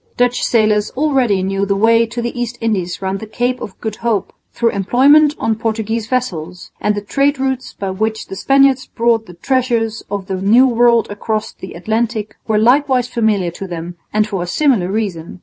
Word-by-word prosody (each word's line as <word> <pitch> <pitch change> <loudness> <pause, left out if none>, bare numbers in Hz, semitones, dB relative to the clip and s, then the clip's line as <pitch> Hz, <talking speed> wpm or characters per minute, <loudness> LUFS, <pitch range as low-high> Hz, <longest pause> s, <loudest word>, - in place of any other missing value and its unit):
Dutch 245 0 +1
sailors 215 -2 +2
already 260 -10 +2
knew 195 +1 -1
the 200 0 0
way 230 +3 +3
to 235 +1 -5
the 240 - -3
East 240 0 -3
Indies 195 -6 -2
round 190 +1 -2
the 220 - -8
Cape 245 +3 -2
of 195 - -8
Good 220 -2 -4
Hope 230 -4 -1 0.2
through 230 -1 +1
employment 280 +9 +4
on 225 - 0
Portuguese 225 0 -2
vessels; 180 -9 -3
and 210 0 +1
the 205 - -4
trade 275 +6 +1
routes 265 -1 -2
by 195 -1 -4
which 220 +3 -2
the 195 - -8
Spaniards 270 +3 +3
brought 230 -1 0
the 180 - -12
treasures 235 0 0
of 200 -2 -4
the 190 -1 -4
New 230 +7 +5
World 235 -2 +3
across 215 +1 -3
the 190 - -10
Atlantic 220 +3 -2
were 215 -1 +1
likewise 250 +2 +3
familiar 215 -7 0
to 190 +3 -7
them 175 0 -6 0.2
and 215 0 +2
for 195 -4 -3
a 175 - -4
similar 220 - +1
reason. 185 -5 -4
220 Hz, 190 wpm, -17 LUFS, 195-245 Hz, 0.2 s, New